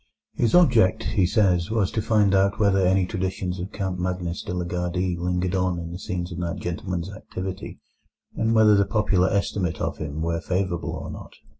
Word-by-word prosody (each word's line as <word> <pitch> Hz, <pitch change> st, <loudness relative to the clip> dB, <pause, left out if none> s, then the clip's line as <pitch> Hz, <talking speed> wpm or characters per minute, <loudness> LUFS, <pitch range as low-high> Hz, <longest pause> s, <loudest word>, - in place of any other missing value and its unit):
His 120 Hz, +4 st, +1 dB
object, 115 Hz, -, +4 dB
he 95 Hz, -5 st, +1 dB
says, 90 Hz, -5 st, +2 dB
was 110 Hz, -4 st, +1 dB
to 110 Hz, -, -1 dB
find 105 Hz, -2 st, +3 dB
out 100 Hz, +1 st, +2 dB
whether 100 Hz, -2 st, +3 dB
any 95 Hz, 0 st, +3 dB
traditions 95 Hz, 0 st, -3 dB
of 90 Hz, +3 st, -5 dB
Count 95 Hz, -3 st, -3 dB
Magnus 90 Hz, -1 st, -2 dB
de -, -, -6 dB
la 90 Hz, 0 st, -2 dB
Gardie 90 Hz, +1 st, -1 dB
lingered 90 Hz, +1 st, -1 dB
on 90 Hz, -2 st, +1 dB
in 85 Hz, 0 st, -6 dB
the 90 Hz, -, -6 dB
scenes 90 Hz, -1 st, -4 dB
of 85 Hz, -, -5 dB
that 85 Hz, +1 st, -3 dB
gentleman's 90 Hz, +1 st, -4 dB
activity, 95 Hz, -1 st, -6 dB, 0.6 s
and 115 Hz, 0 st, +1 dB
whether 110 Hz, -1 st, +6 dB
the 100 Hz, 0 st, +3 dB
popular 100 Hz, -4 st, +2 dB
estimate 90 Hz, -5 st, -1 dB
of -, -, -3 dB
him 75 Hz, +1 st, -4 dB
were 85 Hz, 0 st, -1 dB
favourable 90 Hz, 0 st, -2 dB
or -, -, -6 dB
not. -, -, -10 dB
90 Hz, 190 wpm, -24 LUFS, 90-100 Hz, 0.6 s, whether